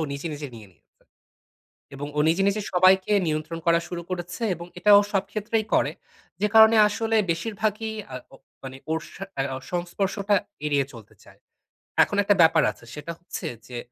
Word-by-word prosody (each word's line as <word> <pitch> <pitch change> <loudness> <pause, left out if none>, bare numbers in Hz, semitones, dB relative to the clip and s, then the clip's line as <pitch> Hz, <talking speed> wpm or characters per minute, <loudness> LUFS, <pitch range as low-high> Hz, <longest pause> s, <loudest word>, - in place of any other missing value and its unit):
নিজে, 140 +4 -5
নিজে 145 -1 -6
নিয়ে 105 -3 -12
নিয়েছে। - - -36 1.1
এবং 145 +1 -5
ও - - +2
নিজে, 170 +4 +2
নিজে 205 +1 0
সবাইকে 185 +2 +4 0.2
নিয়ন্ত্রণ 155 +2 -3
করা 170 0 +5
শুরু 175 -1 -5
করেছে 180 +3 -5
এবং 170 +1 -9
এটা 210 +3 +4
ও - - +3
সব 195 -1 +1
ক্ষেত্রেই 215 +1 -1
করে। - - +3 0.5
যে 210 - +3
কারণে 220 +1 +8
আসলে 225 +2 -1
বেশির 200 +6 -2
ভাগই 220 +1 -1 0.2
আ - - -4 0.2
ও - - -11 0.3
মানে 130 0 -8
ওর 160 - +1 0.2
সা 195 - -7 0.2
আ - - +2 0.3
সংস্পর্শটা 195 +3 -1 0.3
এড়িয়ে 140 -2 +1
চলতে 115 -3 -13
চায়। - - -19 0.6
এখন 205 - -3
একটা 205 0 +3
ব্যাপার 160 -1 +5
আছে। 115 - -18
সেটা 150 +3 -6
হচ্ছে 175 - -7 0.2
যে 125 -1 -7
175 Hz, 175 wpm, -25 LUFS, 155-205 Hz, 1.1 s, কারণে